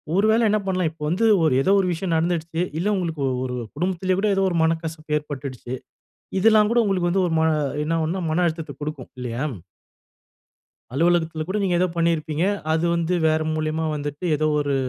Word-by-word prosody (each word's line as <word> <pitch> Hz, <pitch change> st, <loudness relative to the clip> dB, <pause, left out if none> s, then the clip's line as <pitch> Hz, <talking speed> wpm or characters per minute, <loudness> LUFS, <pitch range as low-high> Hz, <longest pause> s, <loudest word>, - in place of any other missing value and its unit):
ஒரு 200 Hz, -, +3 dB
வேளை 225 Hz, -, +3 dB
என்ன 215 Hz, +1 st, +2 dB
பண்ணலாம், 185 Hz, -3 st, +1 dB
இப்ப 160 Hz, -, -25 dB
வந்து 185 Hz, +7 st, +1 dB, 0.2 s
ஒரு 155 Hz, -5 st, +3 dB
ஏதோ 190 Hz, -, +2 dB
ஒரு 190 Hz, -, +1 dB
விஷயம் 170 Hz, +1 st, -2 dB
நடந்துடுச்சு. 165 Hz, 0 st, -1 dB, 0.2 s
இல்லை 185 Hz, -, -1 dB
உங்களுக்கு 165 Hz, -5 st, -2 dB, 0.2 s
ஒரு 125 Hz, -1 st, -3 dB, 0.2 s
குடும்பத்திலே 185 Hz, +3 st, 0 dB
கூட 210 Hz, -, +1 dB
ஏதோ 195 Hz, -, +2 dB
ஒரு 175 Hz, -, -3 dB
மனக்கசப்பு 160 Hz, -1 st, -1 dB
ஏற்பட்டுடுச்சு. 140 Hz, -4 st, -6 dB, 0.7 s
இதெல்லாம் 215 Hz, +1 st, +5 dB
கூட 240 Hz, -, +3 dB
உங்களுக்கு 185 Hz, -3 st, +1 dB
வந்து 190 Hz, +1 st, +2 dB
ஒரு 165 Hz, -, -2 dB
ம -, -, +3 dB, 0.4 s
என்ன 165 Hz, +2 st, 0 dB
ஆகும்ன்னா 165 Hz, +4 st, -1 dB
மன 180 Hz, +3 st, +2 dB
அழுத்தத்தை 160 Hz, -3 st, -4 dB
குடுக்கும் 145 Hz, -4 st, -6 dB
இல்லியா? 125 Hz, +1 st, -3 dB, 1.5 s
அலுவலகத்துல 165 Hz, +1 st, +1 dB
கூட 190 Hz, +5 st, -2 dB
நீங்க 185 Hz, -3 st, +1 dB
ஏதோ 185 Hz, -, +3 dB
பண்ணியிருப்பீங்க. 165 Hz, -2 st, 0 dB, 0.3 s
அது 160 Hz, +1 st, +1 dB
வந்து 170 Hz, +1 st, 0 dB
வேற 155 Hz, 0 st, +2 dB
மூலியமா 155 Hz, +1 st, -1 dB
வந்துட்டு 145 Hz, +3 st, -5 dB
ஏதோ 155 Hz, +1 st, +1 dB
ஒரு 145 Hz, -1 st, 0 dB
165 Hz, 175 wpm, -23 LUFS, 155-180 Hz, 1.5 s, இதெல்லாம்